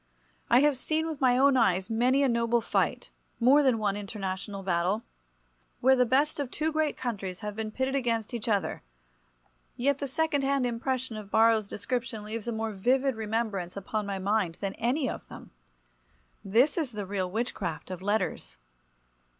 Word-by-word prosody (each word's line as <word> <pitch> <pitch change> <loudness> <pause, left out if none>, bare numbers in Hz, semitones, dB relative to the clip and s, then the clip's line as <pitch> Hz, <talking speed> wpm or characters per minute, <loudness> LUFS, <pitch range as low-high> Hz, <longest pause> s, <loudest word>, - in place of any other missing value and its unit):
I 240 +2 +6
have 290 -2 +3
seen 315 +4 -1
with 315 -4 -5
my 250 -2 +4
own 275 +1 +5
eyes 190 -6 +2
many 250 +5 +2
a - - +4
noble 235 -1 +2
fight, - - -1 0.3
more 260 +5 +6
than 260 -5 +3
one 205 -2 0
international 195 -1 -5
battle, 185 +4 0 0.8
where 265 +2 +5
the 250 -1 +3
best 285 +5 +2
of 280 -3 -2
two 310 +4 -1
great 310 -1 0
countries 200 -7 -4
have 210 -1 -5
been 220 0 -3
pitted 260 +4 -2
against 235 -4 -1
each 235 -1 -3
other—yet - - -4
the 280 - -2
second 305 0 0
hand 275 -1 +1
impression 245 0 -2
of 210 -2 -8
Borrow's 220 -1 +4
description 225 +2 -3
leaves 220 +1 -5
a - - 0
more 220 0 -2
vivid 255 +6 +1
remembrance 215 -5 -2
upon 205 +1 -3
my 200 -1 -2
mind 190 -3 0
than 195 -1 -3
any 255 +5 +1
of - - -5
them. - - -12 0.9
This 245 - +3
is 280 -7 -2
the 205 -2 -4
real 190 -1 -2
witchcraft 190 -5 -3
of 185 -1 -6
letters. 205 - -1
225 Hz, 170 wpm, -28 LUFS, 200-260 Hz, 0.9 s, I